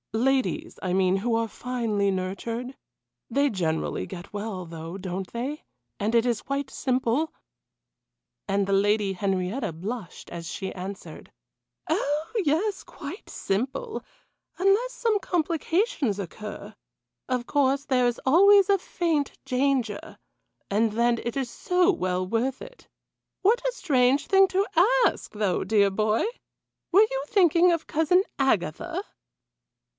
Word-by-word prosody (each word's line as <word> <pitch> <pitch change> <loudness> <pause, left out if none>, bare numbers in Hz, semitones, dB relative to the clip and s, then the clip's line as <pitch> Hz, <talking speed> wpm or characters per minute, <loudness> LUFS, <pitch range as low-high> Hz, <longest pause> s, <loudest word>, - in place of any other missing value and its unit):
Ladies, 270 +7 0
I 185 - -2
mean, 185 0 +3
who 225 +4 0
are 230 0 +1
finely 225 -4 -1
nurtured? 225 +7 -4 0.5
They 280 +4 +2
generally 165 -7 -1
get 185 +1 -9
well, 205 -3 -4
though, 165 +2 -7
don't 185 0 -5
they 265 +6 -4 0.4
and 215 +3 0
it 235 0 +4
is 240 -3 0
quite 275 0 -3
simple 260 +4 0 0.6
" - - -60
And 195 0 +1
the 195 - +1
Lady 205 0 +2
Henrietta 195 +4 -1
blushed 190 +4 -7
as 170 -1 -7
she 190 -1 -5
answered: 190 +2 -8 0.6
"Oh! 300 +6 -1
yes, 350 +7 0
quite 335 +5 -9
simple 270 - -3 0.5
unless 395 +7 +3
some 455 -4 +1
complications 330 - 0
occur. 205 +2 -7 0.5
Of 250 -2 -1
course 280 0 +1
there 250 -3 +3
is 240 - -1
always 395 +7 +6
a 395 -1 +4
faint 325 -5 -1
danger, 255 -4 -1 0.5
but 215 +2 +2
then 235 +1 +2
it 240 +2 -3
is 265 -3 -1
so 360 +6 +2
well 185 - -1
worth 235 +7 -1
it. - - -12 0.5
What 445 +5 +4
a - - +2
strange 275 - +2
thing 390 0 +6
to 390 +2 +1 0.4
ask, - - -1
though, 205 -4 0
dear 200 -2 +3
boy! 215 +2 +1 0.7
Were 400 +5 +7
you 270 0 -2
thinking 355 -2 +4
of 335 -2 -1
Cousin 325 +4 +3 0.2
Agatha?" 190 - 0
245 Hz, 135 wpm, -26 LUFS, 200-315 Hz, 0.7 s, Were